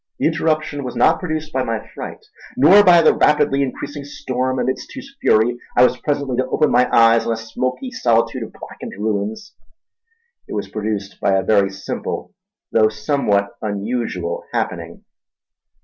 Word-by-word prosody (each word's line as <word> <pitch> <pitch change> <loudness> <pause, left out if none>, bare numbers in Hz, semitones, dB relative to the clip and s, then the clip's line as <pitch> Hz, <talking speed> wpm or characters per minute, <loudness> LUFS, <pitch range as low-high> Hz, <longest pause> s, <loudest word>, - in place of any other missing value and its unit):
The - - -1
interruption 155 -3 0
was 125 - -6
not - - +3
produced 155 -3 -4
by 130 - +1
my 115 -3 -3
fright, - - -8 0.3
nor 185 +10 +7
by 175 -3 +6
the - - +6
rapidly 150 -2 +2
increasing 140 +2 -4
storm 130 -2 -3
amidst 130 +1 -2
whose 270 +1 -10
fury 120 +3 +3 0.2
I 125 - +7
was 125 0 +3
presently 140 -4 -2
to 130 0 0
open 155 - +1
my 125 - +3
eyes 115 0 +5
on 115 - +1
a - - -4
smoky 130 - -4
solitude 115 - +1
of - - -6
blackened - - -10
ruins. 110 - -3 0.9
It - - -6
was 100 -2 -4
produced 105 -2 -4
by 100 - +2
a 95 - +1
very 100 -2 +3
simple 95 0 -5 0.4
though 110 -1 +4
somewhat 105 -3 0
unusual 100 -4 -3
happening. - - -4
125 Hz, 160 wpm, -19 LUFS, 110-145 Hz, 0.9 s, nor